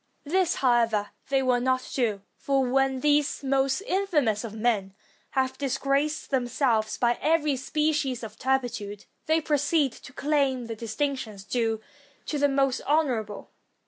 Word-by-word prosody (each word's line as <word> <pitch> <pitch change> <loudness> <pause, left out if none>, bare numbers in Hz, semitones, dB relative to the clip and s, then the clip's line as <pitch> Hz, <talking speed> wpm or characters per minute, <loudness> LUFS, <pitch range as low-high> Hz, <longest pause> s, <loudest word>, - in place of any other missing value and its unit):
This, 350 +3 +1
however, 230 -5 +2 0.2
they 270 -1 +2
will 250 -1 +3
not 255 0 0
do; 215 -6 0
for 275 -1 0
when 265 0 +1
these 295 -1 +2
most 270 +3 +1
infamous 350 - +1
of 220 -2 -6
men 215 -4 0 0.4
have 260 0 0
dis 270 -2 -1
graced 280 +3 0
themselves 245 -4 +1
by 240 0 +1
every 305 -3 +2
species 295 -2 -1
of 220 -1 -8
turpitude, 245 -6 -2 0.2
they 320 +1 +4
proceed 295 -2 +1
to 255 - -13
claim 275 -3 0
the 230 -1 -5
distinctions 230 -2 -3
due 225 0 -1 0.4
to 295 - -2
the 285 0 +3
most 270 -1 +1
honor 290 -6 +2
able. 210 -1 -10
265 Hz, 145 wpm, -26 LUFS, 230-290 Hz, 0.4 s, they